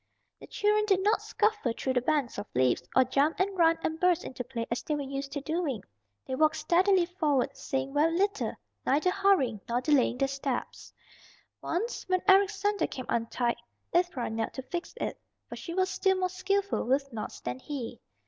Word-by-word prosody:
The - - -12
children 425 0 +2
did 385 -2 +3
not 425 +2 +3
scuffle 425 - 0
through 260 - -1
the 250 - +2
banks 280 -5 0
of 205 - -6
leaves, 125 -1 +3
or 260 - +7
jump 280 +5 +1
and 385 +1 +1
run 330 -2 +4
and 320 0 -2
burst 360 -1 +3
into 255 - -5
play 235 -2 -4
as 235 - -1
they 300 - -2
were 290 - -2
used 275 0 -5
to 285 - -3
doing. 305 - -2 0.4
They 260 - -5
walked 310 +4 +3
steadily 360 +3 +3
forward, 310 -7 0
saying 270 0 -3
very 320 +3 +3
little, 405 +2 0 0.3
neither 305 +7 +2
hurrying 370 - +2
nor 240 +1 +1
delaying 255 -3 +2
their 275 +1 +2
steps. 275 -2 -4 0.7
Once 400 +4 -3
when 370 -1 +1
Eric's 395 +1 +5
sandal 410 0 +1
came 255 - -6
untied 235 +1 0 0.4
Ivra 345 -10 +1
knelt 225 0 -2
to 265 - -5
fix 345 +7 -5
it, - - -3 0.3
for - - -7
she 335 - -6
was 375 0 +2
still 380 -1 +2
more 370 0 0
skillful 390 +2 0
with 270 +1 0
knots 215 -2 -5
than 125 +1 -4
he. 250 - -6
305 Hz, 190 wpm, -29 LUFS, 260-370 Hz, 0.7 s, or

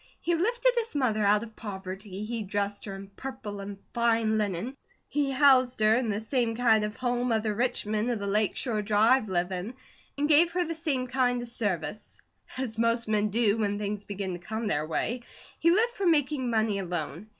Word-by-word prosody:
He 345 - 0
lifted 475 +9 +2
his 460 -7 -5
mother 225 -6 +1
out 205 +2 +4
of 225 -1 -11
poverty, 195 0 -6
he 230 0 -3
dressed 205 0 -3
her 195 -2 -6
'in 195 0 -9
purple 240 -6 -6
and 200 0 -6 0.2
fine 230 -2 +2
linen,' 210 +5 -2 0.3
he 285 -1 0
housed 260 -3 +4
her 215 +1 +5
in 240 -1 0
the 205 0 -1
same 230 0 -1
kind 225 -3 +3
of 210 +1 -3
home 245 -1 -1
other 220 -1 +1
rich 245 +2 -1
men 215 +2 -1
of 240 - 0
the 200 - -5
Lake 205 +1 +1
Shore 225 -5 0
Drive 215 +3 +3
live 180 0 0
in, 190 +7 -4 0.4
and 290 +1 +1
gave 325 +3 +5
her 355 0 +1
the 330 - -3
same 305 -6 -1
kind 250 -1 +1
of - - -5
service. 205 -5 -2 0.4
As 235 -4 -3
most 230 0 +1
men 215 -1 +1
do, 220 0 +2
when 205 -2 0
things 205 0 -4
begin 195 -2 -4
to 175 - -6
come 220 +5 -4
their 155 -6 0
way, 235 +9 -1 0.4
he 335 - +4
lived 445 +7 +3
for 390 - -1
making 290 -5 +2
money 220 -3 +1
alone. 175 +1 -4
220 Hz, 205 wpm, -28 LUFS, 205-255 Hz, 0.4 s, her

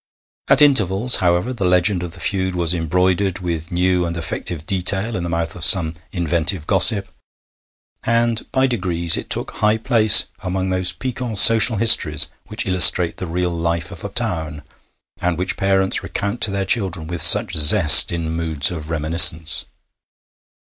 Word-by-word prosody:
At 140 +2 +3
intervals, 115 -4 +1
however, 90 +7 -3
the 115 - -7
legend 90 +1 -1
of 90 -2 -9
the - - -11
feud 95 -2 -4
was 85 -1 -1
embroidered 90 +3 -3
with 85 -3 -7
new 90 0 -2
and 85 0 -7
effective 85 -1 -6
detail 95 +5 -2
in 90 - -6
the 85 - -7
mouth 85 0 -6
of 90 - -9
some 80 -3 +4 0.2
inventive 85 -1 -2
gossip, 100 +2 +2 1.0
and 115 0 -3
by 130 0 -1
degrees 90 -9 0
it - - -9
took - - -3
high 105 +1 -2
place 110 -3 +4 0.2
among 95 -1 -6
those 95 -1 +1
piquant 125 -3 -7
social 115 0 +6
histories 85 -8 +3 0.2
which 110 +1 -4
illustrate 90 -2 +4
the 90 - -8
real 90 +1 -5
life 85 -1 -5
of - - -11
a - - -7
town, 75 -2 -6 0.6
and 90 -2 -4
which 90 +1 -4
parents 95 0 -2
recount 100 +4 -7
to - - +2
their 100 0 -5
children 95 -6 -3
with 85 0 -3
such - - +6
zest 80 +2 +6
in 85 -2 -6
moods 80 -3 0
of 80 -3 -10
reminiscence. 80 0 +2
90 Hz, 160 wpm, -16 LUFS, 85-100 Hz, 1.0 s, social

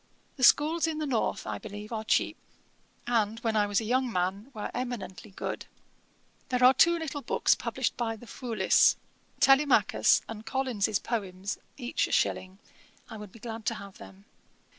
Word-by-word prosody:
The 260 - -5
schools 315 +6 +5
in 320 -1 -2
the 310 - -2
north, 250 -6 -1
I 105 -1 -4
believe, 210 - -9
are 220 -1 -3
cheap; 220 - +1 0.7
and, 225 -2 0
when 225 -2 -1
I 210 -1 +3
was 205 -1 +1
a - - -4
young 255 +2 +1
man, 190 +5 -2
were 215 -5 -6
eminently 245 -5 -5
good. 190 - -5 0.8
'There 250 0 +1
are 255 +1 +8
two 340 +6 +4
little 305 -3 -5
books - - +2
published - - -2
by 230 -2 -2
the 225 - -13
Foulis, 235 -1 +2 0.4
Telemachus 270 +1 +4
and 220 -1 -8
Collins's 225 -4 0
Poems, 195 -4 -4 0.2
each 250 -2 -1
a - - -9
shilling: 185 +1 0 0.5
I 220 - -7
would 210 -2 -10
be - - -14
glad 225 0 -7
to 230 - +1
have 200 -2 -11
them. 95 0 -14
225 Hz, 170 wpm, -28 LUFS, 205-255 Hz, 0.8 s, are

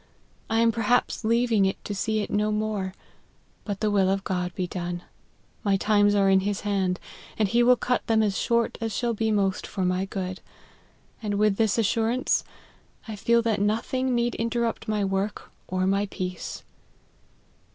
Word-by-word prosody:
I 225 +1 +2
am 230 0 +4
perhaps 230 +2 +1
leaving 230 -2 +3
it 190 - -2
to 205 - -3
see 215 +2 0
it - - -5
no 210 +1 +1
more; 210 -3 -2 0.7
but 205 -2 -4
the 215 -1 +1
will 195 -2 +3
of 195 0 0
God 180 -2 -2
be 185 - -1
done; 175 0 -4 0.6
my 200 -2 +2
times 205 0 +3
are 200 -1 +4
in 190 0 +5
his 205 +1 -2
hand, 195 -3 0 0.4
and 215 - +2
he 235 +5 +2
will 250 +1 +6
cut 250 0 -1
them 220 -1 +3
as 205 -2 0
short 235 +2 0
as 225 -1 -2
shall 240 -1 0
be 220 0 0
most 195 -2 0
for 190 -2 -2
my 185 +1 0
good: 185 -1 -5 0.8
and 210 -2 -2
with 210 -1 +2
this 220 -2 +2
assuraiite, 230 +3 +1 0.7
I 220 - -5
feel 235 +3 +2
that 220 -3 0
no 210 +2 +2
thing 255 +2 -1
need 240 0 +1
interrupt 230 0 -2
my 210 -2 0
work 195 +2 -2 0.2
or 185 0 0
my 195 +2 +1
peace." 180 -2 -5
210 Hz, 180 wpm, -26 LUFS, 195-225 Hz, 0.8 s, will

